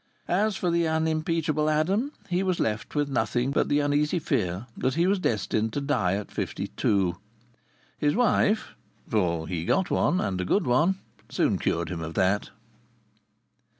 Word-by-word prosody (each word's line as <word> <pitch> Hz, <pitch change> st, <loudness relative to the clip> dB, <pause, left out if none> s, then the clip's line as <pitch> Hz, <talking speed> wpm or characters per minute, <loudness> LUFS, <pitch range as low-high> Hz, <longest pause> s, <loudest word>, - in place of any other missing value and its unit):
As 205 Hz, +3 st, +1 dB
for 180 Hz, -, 0 dB
the 170 Hz, -1 st, +2 dB
unimpeachable 160 Hz, -1 st, 0 dB
Adam, 190 Hz, -, +1 dB, 0.2 s
he 180 Hz, 0 st, 0 dB
was 185 Hz, -2 st, 0 dB
left 110 Hz, +5 st, -2 dB
with 145 Hz, -1 st, +1 dB
nothing 120 Hz, 0 st, 0 dB
but -, -, +1 dB
the 145 Hz, 0 st, +3 dB
uneasy 145 Hz, +3 st, +1 dB
fear 90 Hz, -, -1 dB
that 130 Hz, 0 st, -1 dB
he 170 Hz, -, +2 dB
was 195 Hz, +1 st, +2 dB
doomed 110 Hz, -, 0 dB
to -, -, -1 dB
die 125 Hz, -10 st, +1 dB
at 100 Hz, 0 st, -5 dB
fifty -, -, -3 dB
two. 95 Hz, -4 st, +1 dB, 0.8 s
His 145 Hz, -, +2 dB
wife 220 Hz, -2 st, +2 dB, 0.4 s
(for 85 Hz, -7 st, 0 dB
he 85 Hz, -3 st, -3 dB
got 190 Hz, -, +1 dB
one, 180 Hz, -, +2 dB
and 95 Hz, -3 st, -1 dB
a -, -, -1 dB
good 185 Hz, -, +1 dB
one) 155 Hz, +10 st, +3 dB, 0.3 s
soon -, -, +1 dB
cured 85 Hz, -1 st, -1 dB
him 85 Hz, -3 st, -4 dB
of 80 Hz, 0 st, -6 dB
that. 95 Hz, +2 st, +1 dB
145 Hz, 165 wpm, -26 LUFS, 100-170 Hz, 0.8 s, the